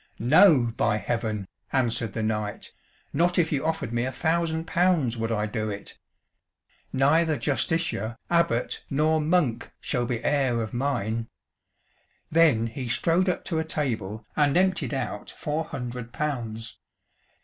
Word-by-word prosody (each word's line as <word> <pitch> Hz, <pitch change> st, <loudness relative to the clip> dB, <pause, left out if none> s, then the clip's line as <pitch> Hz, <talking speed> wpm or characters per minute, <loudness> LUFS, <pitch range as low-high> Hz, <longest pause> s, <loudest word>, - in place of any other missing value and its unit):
"No, 130 Hz, -, +5 dB
by 105 Hz, -, +2 dB
Heaven!" 110 Hz, -3 st, -2 dB, 0.2 s
answered 115 Hz, -5 st, 0 dB
the 110 Hz, -, -2 dB
knight, 105 Hz, -1 st, -3 dB, 0.4 s
"not 175 Hz, +4 st, +2 dB
if 165 Hz, -3 st, +2 dB
you 145 Hz, -3 st, 0 dB
offered 160 Hz, -7 st, -2 dB
me 120 Hz, 0 st, +1 dB
a 130 Hz, -, -2 dB
thousand 160 Hz, +3 st, 0 dB
pounds 170 Hz, -8 st, +2 dB
would 115 Hz, 0 st, -2 dB
I 105 Hz, -1 st, 0 dB
do 110 Hz, 0 st, -2 dB
it! 100 Hz, -1 st, -7 dB, 0.9 s
Neither 155 Hz, +4 st, +3 dB
Justiciar, 130 Hz, -, -1 dB
abbot, 170 Hz, -9 st, +1 dB
nor 155 Hz, +3 st, +2 dB
monk 150 Hz, -7 st, +1 dB
shall 120 Hz, -1 st, -1 dB
be 120 Hz, -3 st, -2 dB
heir 135 Hz, -5 st, +2 dB
of 110 Hz, -, -7 dB
mine." 115 Hz, -4 st, -1 dB, 1.0 s
Then 155 Hz, -9 st, +4 dB
he 120 Hz, +2 st, -5 dB
strode 170 Hz, +9 st, +2 dB
up 180 Hz, -, -2 dB
to 165 Hz, -3 st, -1 dB
a -, -, +1 dB
table 110 Hz, -9 st, -3 dB
and 145 Hz, +1 st, +3 dB
emptied 185 Hz, -5 st, +1 dB
out 110 Hz, -5 st, -4 dB
four 155 Hz, +2 st, -2 dB
hundred 125 Hz, -3 st, -6 dB
pounds. 115 Hz, -7 st, -4 dB
130 Hz, 140 wpm, -26 LUFS, 115-160 Hz, 1.0 s, No